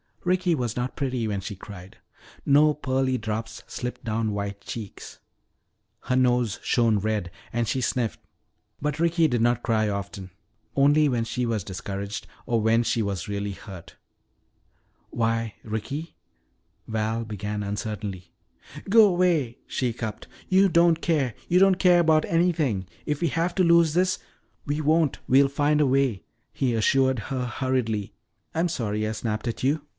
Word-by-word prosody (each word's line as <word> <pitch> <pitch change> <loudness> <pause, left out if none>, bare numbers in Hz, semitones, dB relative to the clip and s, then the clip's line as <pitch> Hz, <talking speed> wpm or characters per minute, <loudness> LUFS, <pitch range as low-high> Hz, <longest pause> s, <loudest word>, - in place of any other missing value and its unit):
Ricky 180 -1 +2
was 120 -7 -2
not 125 +1 -3
pretty 130 -5 -1
when 100 -2 -2
she 100 - -6
cried. 95 -1 -11 0.5
No 150 +2 +5
pearly 130 -2 0
drops 110 0 -4
slipped 125 0 -6
down 110 -1 -1
white 100 0 -4
cheeks. 105 -3 -8 0.8
Her 125 - -1
nose 125 -4 +2
shone 115 -4 +2
red 105 -3 -2 0.2
and 120 0 -1
she 130 - -1
sniffed. 120 -2 -1 0.6
But 150 +1 -2
Ricky 170 -1 +3
did 120 -5 0
not 120 0 +2
cry 110 -3 +1
often. 100 -1 -5 0.5
Only 145 +2 +4
when 120 -3 0
she 120 +2 -2
was 110 -4 -1
discouraged, 100 +2 -5 0.2
or 115 -2 +1
when 115 +2 +3
she 115 - 0
was 100 -4 -3
really 100 0 -3
hurt. 95 -3 -11 1.1
"Why, 115 -1 -1
Ricky 140 +9 -5 0.4
" - - -44
Val 110 +2 -1
began 105 -1 -4
uncertainly. 100 -2 -5 0.6
"Go 215 -1 +7
'way," 170 -9 +1
she 130 - -1
hiccupped. 110 -3 -5 0.2
"You 190 +1 +5
don't 170 -1 +4
care 145 -8 +1
you 180 - +3
don't 190 -1 +5
care 175 -2 +5
'bout 155 -1 +4
anything. 155 - +1 0.2
If 150 0 -1
we 170 - +2
have 170 +4 -1
to 185 - +3
lose 170 -2 +5
this 185 +1 +2 0.2
" - - -42
"We 145 +2 -1
won't! 155 -1 +2
We'll 135 +2 +5
find 145 +2 +2
a 145 - +4
way!" 130 -6 +1 0.3
he 130 -3 0
assured 130 +4 +3 0.2
her 125 -1 -1
hurriedly. 120 -4 -1 0.4
"I'm 170 +2 +1
sorry 110 -7 -2
I - - -2
snapped 110 +1 -3
at 115 - -4
you. 145 +4 +2
120 Hz, 160 wpm, -25 LUFS, 110-150 Hz, 1.1 s, Go